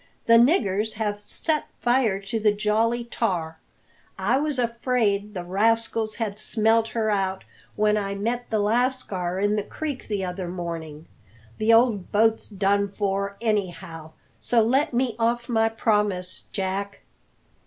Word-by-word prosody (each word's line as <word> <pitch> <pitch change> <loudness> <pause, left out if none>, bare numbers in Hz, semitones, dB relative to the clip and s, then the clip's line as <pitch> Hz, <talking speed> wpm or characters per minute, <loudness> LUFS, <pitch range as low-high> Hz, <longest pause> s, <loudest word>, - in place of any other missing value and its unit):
"The 230 0 +7
niggers 220 - +2
have 210 -1 -2
set 305 +9 -2
fire 240 -5 +2
to 200 +3 -3
the 215 -1 +4
Jolly 220 +3 +1
Tar. 175 -9 -2 0.6
I 215 +8 +1
was 300 -2 -1
afraid 230 -4 0
the 180 - -3
rascals 220 +3 +1
had 215 -3 -3
smelt 225 +1 +2
her 220 -2 -1
out 190 -1 -1 0.3
when 210 0 +2
I 200 -1 -2
met 235 +4 -2
the 220 - 0
lascar 210 -5 0
in 205 +2 +1
the 205 - 0
creek 290 +3 -5
the 200 -3 -2
other 180 0 -4
morning. 165 -3 -6 0.5
The 220 +1 +3
old 225 -5 +3
boat's 220 +1 +2
done 200 0 +1
for, 200 0 -2
anyhow; 175 -7 -3 0.3
so 235 -2 +3
let 270 +7 +2
me 245 -2 0
off 235 +1 0
my 225 -2 +2
promise, 210 -5 0
Jack." 195 +1 -3
210 Hz, 145 wpm, -24 LUFS, 195-230 Hz, 0.6 s, The